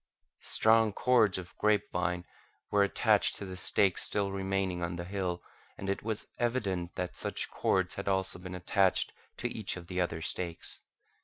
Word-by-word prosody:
Strong 110 -1 +4
cords 115 -5 +3
of 90 -2 -8
grape 105 -1 +3
vine 90 0 -1 0.5
were 105 - +4
attached 100 - +3
to - - -5
the 95 -1 -6
stakes 95 +1 +3
still 100 -1 +1
remaining 95 -2 -1
on 85 0 -2
the 85 - -4
hill, 90 -1 -3 0.3
and 100 0 -2
it 100 - -3
was 110 -1 -2
evident 100 -8 -1
that 90 -1 -3
such - - -2
cords 95 -2 +1
had 100 - -6
also 95 -2 +1
been 90 0 -7
attached 95 +1 +2 0.2
to - - -1
each 110 -4 -2
of 85 - -9
the 90 +1 -2
other 85 -2 -1
stakes. 85 +1 -2
95 Hz, 170 wpm, -31 LUFS, 90-100 Hz, 0.5 s, Strong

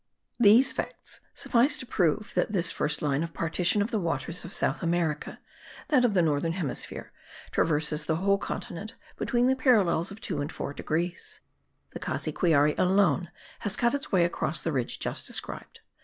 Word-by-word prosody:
These 235 +4 +6
facts - - -4 0.2
suffice 270 +5 +2
to - - -5
prove 205 - 0
that - - 0
this 170 -4 +3
first 150 0 -1
line 145 -1 +1
of 165 0 -5
partition 180 +5 +1
of 220 - -5
the 220 - 0
waters 170 -1 -3
of 175 - -8
South - - 0
America 170 -3 -1 0.5
(that 265 -5 +4
of 230 -5 +2
the 180 - +4
northern 160 +1 +1
hemisphere) 165 -7 -4 0.4
traverses 150 -1 +1
the 160 - +1
whole 200 +4 +2
continent 195 +4 -6 0.2
between 240 0 +1
the 260 +1 +3
parallels 205 - +3
of 200 - -10
2 180 -10 -3
and 145 - -4
4 140 - -5
degrees. 170 +4 -3 0.5
The - - -7
Cassiquiare 150 -4 +1
alone 180 -3 +3 0.3
has 205 -2 -1
cut 240 +1 +1
its 285 -1 -3
way 180 -3 +4
across 160 -2 -1
the 165 - -1
ridge 130 -5 -2
just - - -3
described. - - -4
175 Hz, 170 wpm, -27 LUFS, 160-210 Hz, 0.5 s, These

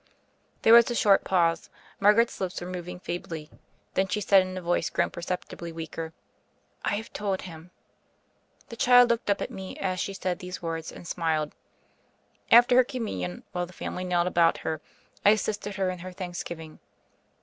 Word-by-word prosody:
There 225 - +7
was 235 0 +8
a 240 - -2
short 200 -3 +4
pause; 170 -3 +1 0.3
Margaret's 210 +3 +4
lips 185 -1 -2
were 175 - -6
moving 180 0 -6
feebly; 165 -4 -6 0.4
then 190 0 +1
she 200 +3 -1
said 195 -1 +5
in 185 0 -5
a - - -2
voice 175 +1 0
grown - - 0
perceptibly 170 -1 -5
weaker, 160 0 -6 0.7
"I - - +1
have 220 +2 -6
told 200 -2 -2
Him." 165 -1 -10 1.0
The 230 - -7
child 245 -1 +6
looked 230 -2 -1
up 200 - +1
at - - -6
me 190 -1 -7
as 185 -1 -2
she 195 0 -3
said 185 -2 -2
these 180 0 -6
words, 165 -1 -4
and 175 - -11
smiled. 160 -3 -1 1.0
After 245 +2 +7
her 255 - +8
Communion, 95 - -4
while 175 0 -2
the 180 - -15
family 180 - -5
knelt 175 -1 +1
about 170 -2 +3
her, 160 -1 -2 0.4
I - - +7
assisted 205 -1 0
her 190 -2 0
in 180 - -7
her 185 +2 -7
thanksgiving. 175 -3 -7
180 Hz, 175 wpm, -27 LUFS, 170-205 Hz, 1.0 s, was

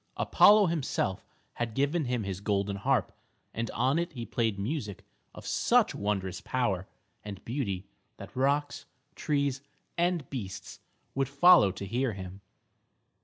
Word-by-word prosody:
Apollo 210 0 +6
himself 150 - -1 0.3
had 115 -2 -4
given 145 +3 +1
him 125 -2 -1
his 95 -1 -4
golden 100 -1 0
harp, 125 -2 0 0.4
and 115 0 -3
on 130 +7 +1
it 170 0 -3
he 120 -3 -5
played 110 -1 -1
music 105 - -4 0.3
of - - -10
such - - +3
wondrous 95 -3 -2
power 100 -8 -1 0.4
and 100 -3 -8
beauty 105 -7 -3 0.3
that - - -11
rocks, 140 +2 0 0.3
trees 140 -4 -1 0.4
and 175 -4 +1
beasts 105 -9 -6 0.3
would 135 -1 0
follow 140 - +6
to 100 +1 -7
hear 120 +4 -1
him. 95 0 -8
120 Hz, 135 wpm, -29 LUFS, 100-140 Hz, 0.4 s, Apollo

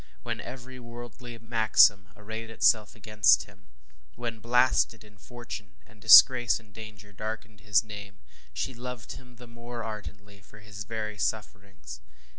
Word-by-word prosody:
When - - -4
every 130 +1 -10
worldly 120 0 -10
maxim 110 -3 +3
arrayed 110 +2 -8
itself 110 -1 +2
against 105 -4 +3
him; 95 -2 -20 0.5
when 115 -1 -6
blasted 120 0 +1
in 105 -1 -20
fortune, 115 -5 -10
and 110 -1 -22
disgrace 120 +2 +7
and 110 -3 -22
danger 105 -1 -12
darkened 110 +1 -7
around 100 - -21
his 105 0 +4
name, 105 -2 -10 0.3
she 130 - -4
loved 125 -1 -8
him 125 -2 -12
the 120 +1 -13
more 120 0 -9
ardently 100 -2 -9
for 100 +2 -18
his 105 -1 -10
very 105 -2 -5
sufferings. 100 - -5
110 Hz, 145 wpm, -27 LUFS, 105-120 Hz, 0.5 s, disgrace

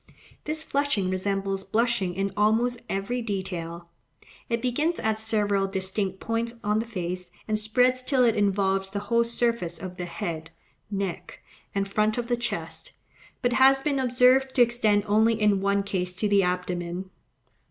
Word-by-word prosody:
This 310 +1 -3
flushing 275 -12 0
resembles 195 0 -1
blushing 215 -3 0
in 195 +1 -1
almost 225 +4 +2
every 200 +6 -2
detail: 180 -5 -4 0.6
it 230 0 +1
begins 295 +8 0
at 220 0 0
several 205 -3 +1
distinct 190 0 -2
points 230 +1 -2
on 210 +1 +1
the 225 - -3
face, 180 -4 -4 0.2
and 215 -1 0
spreads 250 +4 +2
till 255 0 +2
it 230 - +3
involves 195 -1 +1
the 200 - -5 0.2
whole 235 0 +5
surface 235 -7 -1
of 180 +1 -8
the 180 - -4
head, 165 -1 -5 0.4
neck, 195 -3 -4 0.3
and 195 0 0
front 215 +2 +1
of 240 0 -3
the 240 - +3
chest; 240 0 -5 0.5
but 245 0 +2
has 270 +1 +5
been 285 -3 0
observed 255 +1 +3
to 250 - +7
extend 220 -4 +2
only 220 +2 +3
in 210 -2 +3
one 200 0 +1
case 180 -2 -2
to 210 +3 0
the 200 -1 +4
abdomen. 180 0 -2
210 Hz, 160 wpm, -26 LUFS, 190-235 Hz, 0.6 s, to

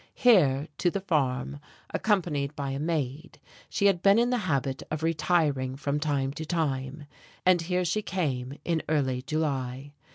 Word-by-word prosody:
Here, 155 - +4
to 180 - +3
the 195 +3 -3
farm, 145 -6 0 0.3
accompanied 155 -9 0
by 140 -2 -3
a 135 - -3
maid, 155 -1 -3 0.3
she 200 - 0
had 195 -4 +4
been 200 +2 +6
in 240 +1 +3
the 250 - +1
habit 135 -2 0
of 155 0 -3
retiring 155 -5 +1
from 145 +1 -1
time 140 -3 0
to 160 - -5
time, 145 -3 -2 0.4
and 180 -2 +5
here 180 +2 0
she 200 +5 0
came 140 -9 -2
in 165 -2 +1
early 130 -5 +1
July. 140 -2 -2
150 Hz, 160 wpm, -28 LUFS, 135-175 Hz, 0.4 s, been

